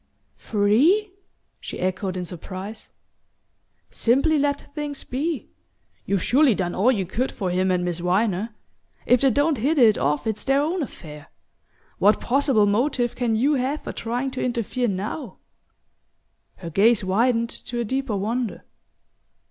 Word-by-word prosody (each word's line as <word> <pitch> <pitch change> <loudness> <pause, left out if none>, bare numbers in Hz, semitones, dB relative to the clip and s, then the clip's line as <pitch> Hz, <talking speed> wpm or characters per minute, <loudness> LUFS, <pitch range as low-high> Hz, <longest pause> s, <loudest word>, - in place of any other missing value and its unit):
"Free?" 280 - +2 0.5
she - - -7
echoed 185 0 -2
in 180 - -3
surprise. 185 +5 -8 1.0
"Simply 280 +6 +2
let 285 0 -2
things 295 -2 -5
be. 295 +3 -3 0.6
You've 195 -3 0
surely 270 -3 +4
done 175 -2 -2
all 225 +7 +3
you 200 -7 -1
could 240 +9 -2
for 185 -4 -3
him 185 +1 +1
and 180 -1 +1
Miss 175 -1 -2
Viner. 200 +4 0 0.5
If 250 -1 +4
they 275 - +5
don't 285 +2 +1
hit 295 +8 +1
it 225 -5 +5
off 150 +8 0
it's 220 -2 -2
their 270 0 +2
own 325 +5 0
affair. 150 - -8 0.7
What 205 +2 +4
possible 260 -4 +2
motive 240 +3 +1
can 240 -3 0
you 270 +7 +2
have 275 +2 -1
for - - -5
trying 245 +4 -3
to 260 - -4
interfere 240 0 -1
now?" 205 +4 -4 1.2
Her 170 -2 -8
gaze 210 +5 +4
widened 230 +5 +1
to 240 - -4
a 235 - -1
deeper 260 -1 -2
wonder. 225 +3 -2
230 Hz, 150 wpm, -23 LUFS, 195-270 Hz, 1.2 s, they